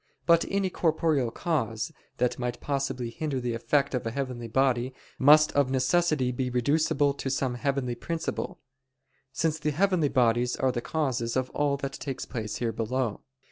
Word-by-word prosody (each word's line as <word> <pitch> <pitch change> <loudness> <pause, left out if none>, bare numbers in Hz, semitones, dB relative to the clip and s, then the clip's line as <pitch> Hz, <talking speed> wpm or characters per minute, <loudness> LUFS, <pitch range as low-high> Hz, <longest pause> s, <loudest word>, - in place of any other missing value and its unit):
But 170 -1 +5
any 195 -1 0
corporeal 155 -7 +1
cause, 115 -6 -2 0.3
that 125 0 0
might 125 -1 -3
possibly 135 -4 -2
hinder 145 +1 -2
the 120 -1 -2
effect 140 +5 +1
of 125 - -1
a - - +1
heavenly 125 -2 -4
body, 130 +1 +1 0.2
must 150 +3 +7
of 140 -2 +2
necessity 135 0 +2
be 125 +1 -2
reducible 145 +3 +2
to 140 - -4
some 130 -1 0
heavenly 135 -1 -1
principle: 165 +6 -4 0.7
since 160 +3 0
the 150 - 0
heavenly 170 -1 +2
bodies 125 -1 +2
are 130 - +1
the 120 -1 -3
causes 125 -7 -1
of 130 0 -1
all 145 -1 +1
that 140 -1 -4
takes 135 -2 -5
place 110 -3 -4
here 115 -2 -1
below. 115 0 -2
135 Hz, 165 wpm, -28 LUFS, 125-150 Hz, 0.7 s, must